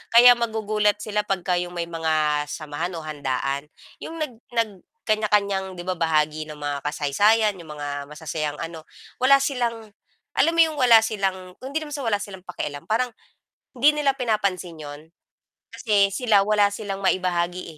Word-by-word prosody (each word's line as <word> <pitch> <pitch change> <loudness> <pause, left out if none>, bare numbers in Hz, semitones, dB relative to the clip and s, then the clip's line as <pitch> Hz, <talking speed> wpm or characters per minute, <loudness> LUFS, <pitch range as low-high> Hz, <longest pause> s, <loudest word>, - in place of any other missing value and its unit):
kaya 245 +1 +10
magugulat 215 -3 +1
sila 210 -1 -2
'pagka 180 -2 0
'yong 175 0 -5
may 170 - -1
mga 155 -2 +1
samahan 155 +4 -4
o 165 - -6
handaan, 140 -1 -3 0.3
'yong 325 - -7
nag 310 -4 -3 0.2
nag 230 -1 +2 0.3
kanya-kanyang 200 -3 +1
'di 175 - -7
ba 180 -1 -3
bahagi 155 -1 +1
ng 150 - -8
mga 145 -1 -3
kasaysayan, 205 +10 +3
'yong 165 - -11
mga 145 0 -5 0.2
masasayang 150 0 -4
ano, 165 -1 -8 0.3
wala 275 +2 +5
silang 235 -5 -2 0.4
alam 330 - +2
mo 335 - +6
'yong 315 -2 -2
wala 235 -3 +7
silang 190 -4 -2
hindi 280 +5 -3
naman 300 - -9
sa 285 -3 -4
wala 215 - +3
silang 190 -2 -11
pakialam 145 -5 -5
parang, 235 +3 +1 0.6
hindi 300 +4 +4
nila 275 -2 +2
pinapansin 200 - -1
'yon. 145 0 -8 0.7
Kasi, 205 -4 +2
sila 215 -2 +3
wala 210 -1 +4
silang 205 -2 -4
maibahagi, 180 -1 0
195 Hz, 160 wpm, -24 LUFS, 160-225 Hz, 0.7 s, kaya